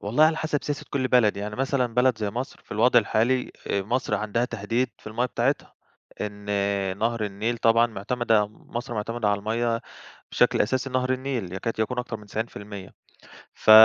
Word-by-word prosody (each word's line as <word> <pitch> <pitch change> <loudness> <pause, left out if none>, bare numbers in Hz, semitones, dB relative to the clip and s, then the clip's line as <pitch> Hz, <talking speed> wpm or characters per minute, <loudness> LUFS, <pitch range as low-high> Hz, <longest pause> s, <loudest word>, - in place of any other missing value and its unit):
والله 120 +10 +4
على 160 0 +3
حسب 155 -2 -1
سياسة 145 -1 -3
كل 130 -2 0
بلد، 115 -5 +4
يعني 105 +1 -4
مثلًا 130 -3 0
بلد 125 -2 +3
زي 105 -2 -1
مصر، 125 +5 -5
في - - -9
الوضع 120 +3 +5
الحالي 120 +4 +1 0.2
آآ 100 - 0
مصر 115 0 0
عندها 110 +3 0
تهديد 115 +2 -1
في - - -20
المَيّة 120 +4 0
بتاعتها، 125 +4 -1 0.5
إن 105 -1 -5 0.5
نهر 115 -1 0
النيل 110 +4 -2
طبعًا 115 +1 +5
معتمدة، 110 0 +1
مصر 120 +3 -7
معتمدة 110 +1 -1
على 100 0 +2
المَيّة 115 +2 0 0.5
بشكل - - +3
أساسي 130 +4 +1
نهر 130 0 +1
النيل، 130 -8 -3
يكاد 110 +4 -3
يكون 125 +3 0
أكتر 125 -2 -3
من 105 - -14
90% 100 -3 -6 0.6
ف - - +1
115 Hz, 175 wpm, -26 LUFS, 105-125 Hz, 0.6 s, الوضع